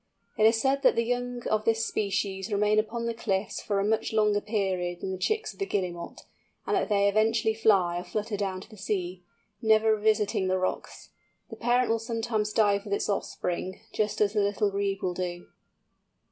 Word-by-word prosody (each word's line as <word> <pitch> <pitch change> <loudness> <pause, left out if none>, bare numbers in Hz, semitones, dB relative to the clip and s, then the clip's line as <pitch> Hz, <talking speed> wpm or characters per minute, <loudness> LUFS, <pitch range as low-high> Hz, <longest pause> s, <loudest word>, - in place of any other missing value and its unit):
It 215 - +5
is 225 0 +3
said 270 +3 +1
that 270 - +4
the 230 - +2
young 245 0 -2
of 215 0 +1
this 225 0 +1
species 200 0 -2
remain 210 +1 +3
upon 230 +2 -2
the 235 - -1
cliffs 200 -3 -2
for 200 -2 -1
a 195 - +1
much 220 +1 0
longer 210 -1 +3
period 185 -5 -1
than 190 - -3
the 190 - -3
chicks 435 - -1
of - - -23
the 395 - 0
Guillemot, 175 - -4 0.4
and - - 0
that 375 - 0
they 200 -1 +3
eventually 220 +2 +2
fly 195 -6 +3
or - - -6
flutter 215 +2 -3
down 195 -2 -3
to - - -13
the 215 - -12
sea, 185 -2 -3 0.4
never 220 0 +4
revisiting 210 -2 +1
the 185 0 +1
rocks. 185 0 -4 0.4
The - - -6
parent 245 0 +2
will 230 - +1
sometimes 225 -2 -2
dive 205 -2 +2
with 200 -1 -1
its - - -2
offspring, 185 -2 -3
just 215 0 -1
as 205 -1 +3
the 210 - +2
Little 200 0 +1
Grebe 200 0 -2
will 180 - 0
do. 175 -1 -4
210 Hz, 200 wpm, -28 LUFS, 195-225 Hz, 0.4 s, It